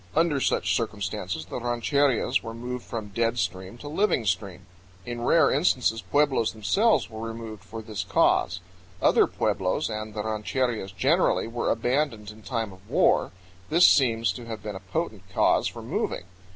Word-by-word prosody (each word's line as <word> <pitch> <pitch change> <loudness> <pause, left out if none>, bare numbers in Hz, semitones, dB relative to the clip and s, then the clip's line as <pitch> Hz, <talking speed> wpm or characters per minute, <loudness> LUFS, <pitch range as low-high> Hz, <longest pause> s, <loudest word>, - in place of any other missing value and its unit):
Under 160 -3 +3
such - - +1
circumstances 95 -6 -3
the 95 - -5
rancherias 125 +2 +1
were 115 0 -7
moved 125 +1 -5
from 110 -3 -6
dead 115 +3 0
stream 95 +1 -3
to 145 - -9
living 155 - +1
stream. 95 -2 -2 0.4
In 120 0 -5
rare 155 +4 +4
instances 125 -6 +2
pueblos 140 -5 +1
themselves 200 - +2
were 110 0 -6
removed 110 -3 -8
for 110 +3 -8
this 110 -2 -4
cause. 95 - +2 0.4
Other - - +4
pueblos, 95 +8 -1
and 110 0 -5
the 105 - -2
rancherias 110 -1 -2
generally, 90 - +2
were 120 +1 -2
abandoned 125 -5 0
in 110 +1 -15
time 115 -3 -3
of 95 +1 -18
war; - - +3 0.4
this 170 +3 +6
seems 115 -4 +4
to 120 - -8
have 110 -3 -6
been 105 -2 -5
a - - -5
potent 100 - -4
cause - - +3
for - - -7
moving. - - -2
115 Hz, 165 wpm, -26 LUFS, 105-125 Hz, 0.4 s, this